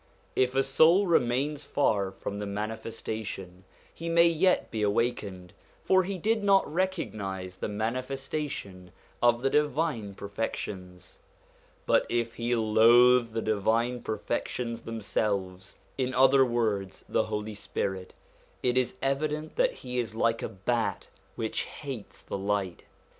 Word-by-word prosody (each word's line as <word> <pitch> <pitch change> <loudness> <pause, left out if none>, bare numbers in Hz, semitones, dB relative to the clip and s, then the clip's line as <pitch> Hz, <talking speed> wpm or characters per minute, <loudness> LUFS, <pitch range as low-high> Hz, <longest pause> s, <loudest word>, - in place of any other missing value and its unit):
If 130 0 +2
a 135 - +4
soul 160 +8 +5
remains 140 -2 +1
far 100 -9 +1
from 100 +1 -6
the 105 - -4
Manifestation, 105 -3 -5 0.3
he 165 0 -5
may 170 0 +6
yet 170 +2 +2
be 110 - -2
awakened; 100 -4 -1 0.3
for 190 0 +4
he 190 +1 -3
did 220 +3 0
not 195 -1 +5
recognise 100 - -2
the - - -3
Mani 110 +5 -1
festation 135 -9 -5 0.3
of 120 0 +3
the 135 - +3
divine 150 -8 0
perfections. 95 -3 -6 0.7
But - - +3
if 115 -1 0
he 120 +1 -1
loathe 115 +2 +5
the 115 - -2
divine 115 +3 +1
perfections 115 +1 -3
themselves, 100 -4 -3 0.2
in 130 0 0
other 135 +1 +6
words 110 -6 -1
the - - +1
Holy 105 0 -4
Spirit, 95 -2 -4 0.5
it 125 0 +3
is 130 0 -1
evident 150 +3 -1
that - - +3
he 125 0 -2
is 110 -2 -3
like 115 0 +1
a - - -3
bat 115 +5 -2 0.3
which 110 -1 -2
hates 135 -8 -8
the - - -5
light. 100 -2 -2
115 Hz, 135 wpm, -28 LUFS, 105-135 Hz, 0.7 s, may